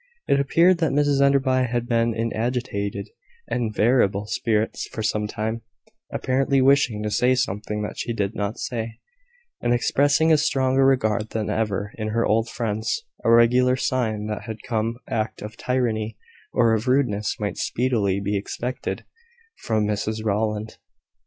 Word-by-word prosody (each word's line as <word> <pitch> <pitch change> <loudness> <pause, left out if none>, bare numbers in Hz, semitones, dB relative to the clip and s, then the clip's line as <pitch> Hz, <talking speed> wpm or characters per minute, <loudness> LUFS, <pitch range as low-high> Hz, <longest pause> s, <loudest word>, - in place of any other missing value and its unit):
It 140 - +3
appeared 170 +6 +4
that 160 -3 +1
Mrs 145 -1 +2
Enderby 135 -2 +3
had 120 -1 -1
been 115 -1 +1
in 115 0 -1
agitated 115 - -2 0.4
and 115 -3 -1
variable 105 -2 +2
spirits 110 0 -1
for 110 - -5
some 105 0 0
time, 110 +2 -3 0.5
apparently 135 +1 +1
wishing 130 -5 +3
to 105 - -2
say 125 +4 +3
something 105 -3 -2
that 105 - -6
she - - -2
did 100 -2 -1
not 100 +2 -3
say, 115 -2 -4 0.6
and 120 - +2
expressing 145 +6 +3
a 155 - +4
stronger 135 -2 +2
regard 110 -5 +1
than 110 -2 -2
ever 105 -1 -1
for 110 -1 -3
her 115 +2 +1
old 115 +2 +1
friends 110 - -2 0.2
a - - +2
regular 125 +2 +5
sign 110 -5 -1
that 110 +2 -5 0.2
some 115 +1 -1
act 110 -1 -3
of 105 +1 -7
tyranny 115 -4 -1 0.3
or 115 -2 +3
rudeness 115 -3 0
might 105 -1 -3
speedily 110 -6 0
be 100 +1 -2
expected 120 +5 -4 0.6
from 110 -2 0
Mrs 110 +1 -2
Rowland. 105 +1 -1
115 Hz, 150 wpm, -23 LUFS, 105-130 Hz, 0.6 s, regular